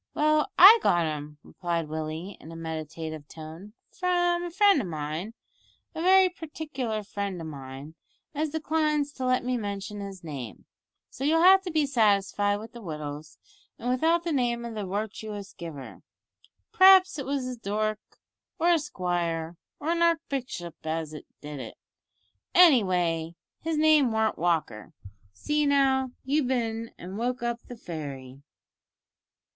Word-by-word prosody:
"Well, 305 0 +3
I 415 +6 +10
got 175 -1 +3
'em," 150 -1 -5
replied 170 -3 -3
Willie 155 +5 -5
in 160 - -11
a - - -9
meditative 160 -1 -6
tone, 165 +6 -10 0.2
"from 350 -1 +1
a - - -4
friend 390 -3 +4
of 195 - -5
mine 160 +7 -5 0.6
a 320 - -5
very 375 +1 +6
partikler 295 -10 -5
friend 200 -2 -4
o' - - -6
mine 140 0 -9 0.4
as 305 +1 -1
declines 305 -1 0
to 260 - -4
let 255 -1 +1
me 250 0 0
mention 205 -1 -5
his 195 -3 -8
name, 135 -8 -7 0.5
so 265 - -7
you'll 325 +3 +3
have 380 +1 +8
to 355 - -3
be 310 -2 +2
satisfied 205 -5 +2
with 215 +2 -8
the 235 - -10
wittles 150 -3 -7 0.4
and 245 - -2
without 325 +6 +2
the 340 - -2
name 240 -4 0
of 235 - -6
the 210 -3 -4
wirtuous 205 0 -5
giver. 150 -6 -9 0.7
P'r'aps 380 -4 +7
it 275 - -4
was 275 -2 -1
a 255 0 -4
dook, 215 -1 -2 0.6
or 340 - +2
a 335 - +4
squire, 175 - -2 0.2
or 305 - -3
a - - +2
archbishop 270 - -1
as 160 -1 -3 0.3
did 150 -1 -7
it. 120 -4 -8 0.8
Anyway 180 - +4 0.2
his 320 -1 -2
name 305 -5 +5
warn't 220 0 0
Walker. 160 -11 -1 0.4
See 295 - 0
now, 270 -2 +3 0.2
you've 285 0 +1
bin 230 -3 -1
an' 185 +3 -8
woke 245 +2 -2
up 235 0 -1
the 245 - -9
fairy." 140 - -7
215 Hz, 150 wpm, -27 LUFS, -, 0.8 s, I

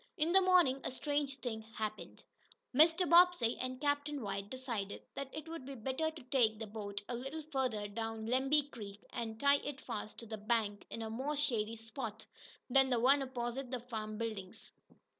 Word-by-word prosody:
In 320 +1 +2
the 385 +1 +7
morning 355 -8 +5
a - - -1
strange 285 +1 -1
thing 220 -3 -3
happened. 220 -1 -6 0.5
Mr. 325 +6 +6
Bobbsey 340 -8 +6
and 255 0 -3
Captain 290 0 0
White 200 0 -3
decided 235 -6 -4
that 275 -1 -4
it 310 +1 -7
would 330 -4 -6
be 275 +1 -7
better 265 +7 -1
to 315 -3 -11
take 245 -4 +3
the 220 - -5
boat 205 -1 -5
a - - -3
little 270 +6 -4
farther 250 -7 0
down 225 +1 -4
Lemby 270 +5 +3
Creek, 205 -2 -9
and 225 -1 -4
tie 280 0 +6
it 280 -1 -5
fast 215 -5 -5
to 230 - -8
the 220 -1 -6
bank 210 -1 0
in 230 - -4
a 220 - -4
more 270 +6 -2
shady 230 -6 0
spot 225 -1 -6 0.4
than 265 +1 +5
the 245 -2 +2
one 270 +4 +5
opposite 255 0 -3
the 255 -1 -2
farm 220 -3 -5
buildings. 215 -5 -5
250 Hz, 185 wpm, -35 LUFS, 220-280 Hz, 0.5 s, the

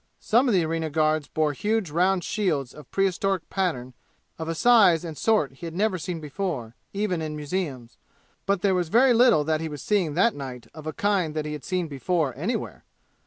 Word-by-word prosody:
Some 240 +5 +3
of 230 - +3
the 175 -3 +3
arena 160 0 -2
guards 155 0 +1
bore 155 -2 0
huge 210 0 -1
round 180 +3 +2
shields 155 - -1
of 150 -4 -13
prehistoric 195 -1 0
pattern 130 -10 -2 0.5
of 160 0 -4
a 165 - -2
size 195 -6 +5
and 160 -2 -6
sort 215 -7 +2
he 165 +6 -8
had 165 - -8
never 195 -1 +1
seen 170 +1 -4
before, 150 - -4 0.2
even 195 -4 -1
in 155 -1 -4
museums. 145 -6 -4 0.5
But 200 -2 +1
there 195 -2 +3
was 180 -3 0
very 245 +6 +5
little 235 -10 +5
that 155 +1 0
he 160 - -3
was 145 -2 -7
seeing 185 -8 +1
that 230 +6 +3
night 130 -4 -7
of 155 0 -10
a - - -1
kind 190 -7 0
that 155 -1 -2
he 150 - -4
had 150 - -7
seen 180 -2 -2
before 150 0 -1
anywhere! 180 - -4
165 Hz, 205 wpm, -25 LUFS, 150-195 Hz, 0.5 s, size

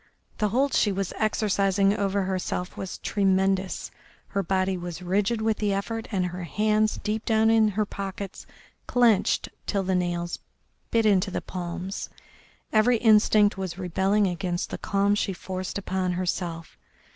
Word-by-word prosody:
The 210 - +2
hold 270 +5 +1
she 210 - +3
was 195 -1 -2
exercising 200 -2 +2
over 200 -1 0
herself 185 -1 -3
was 190 - -5
tremendous, 190 -1 0 0.4
her 200 - 0
body 190 +1 0
was 175 -1 -6
rigid 205 +5 0
with 220 -1 +1
the 205 -2 0
effort, 225 +3 -3
and 185 -4 0
her 180 0 -5
hands 215 +4 +1
deep 215 +1 -1
down 220 0 +3
in 225 -1 +5
her 210 +1 0
pockets 195 -1 -6 0.4
clenched 235 -5 +3 0.2
till 200 -2 0
the 190 0 0
nails 175 -1 -1 0.5
bit 225 -1 +2
into 200 -2 +3
the - - -2
palms. 180 +2 -5 0.6
Every 225 +2 +4
instinct 215 -2 +4
was 185 -2 -4
rebelling 190 +3 +1
against 180 -1 -2
the - - -4
calm 200 +1 +1
she 205 -1 0
forced 185 +1 -5
upon 185 -2 -1
herself. 175 -2 -3
195 Hz, 150 wpm, -26 LUFS, 185-215 Hz, 0.6 s, in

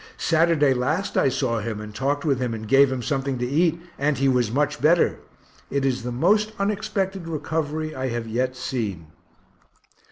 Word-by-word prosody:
Saturday 160 -4 +3
last 155 +10 -1
I - - +4
saw 115 -2 -1
him 110 0 -4
and 105 0 -8
talked 140 +6 -1
with 140 -5 +1
him 125 -3 -1
and 110 0 -7
gave 135 +3 +5
him 130 -2 -3
something 135 -1 -1
to 125 - -2
eat, 165 +5 +1 0.2
and 140 0 +1
he 135 +2 +2
was 125 -4 +2
much 145 +3 0
better 165 +4 +3 0.5
it 140 0 0
is 130 -2 0
the 125 +1 -4
most 210 - +2
unexpected 200 -3 -2
recovery 155 -1 -3
I 130 0 -3
have 120 -2 -3
yet 125 +3 -1
seen. 110 -9 -3
135 Hz, 180 wpm, -24 LUFS, 125-160 Hz, 0.5 s, gave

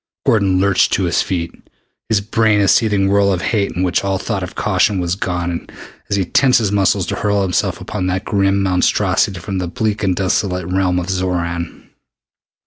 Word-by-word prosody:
Gordon 100 -4 +2
lurched 100 0 +2
to 95 - +1
his 85 -1 +1
feet, 85 -3 -3 0.6
his 110 -2 +2
brain 110 0 +2
a 100 - +2
seething 105 -3 +3
whirl 100 0 +3
of 90 -2 -2
hate 105 -3 0
in 90 +3 -2
which 90 0 0
all 95 -1 0
thought 100 +1 -3
of 90 - -7
caution 100 -3 +1
was 85 -1 -1
gone 90 -2 -3 0.4
as - - +1
he 95 -2 0
tensed 130 +7 +3
his 110 -4 0
muscles 100 -2 +2
to - - -3
hurl 100 -1 0
himself 90 -3 -1
upon 90 - -4
that 95 0 -2
grim 100 -1 +1
monstrosity 95 0 +1
from 95 +3 -4
the 90 - -3
bleak 105 +4 -2
and 95 -3 +1
desolate 90 -1 -1
realm 90 0 0
of 90 - -1
Xoran. 90 -2 -3
95 Hz, 190 wpm, -17 LUFS, 90-100 Hz, 0.6 s, seething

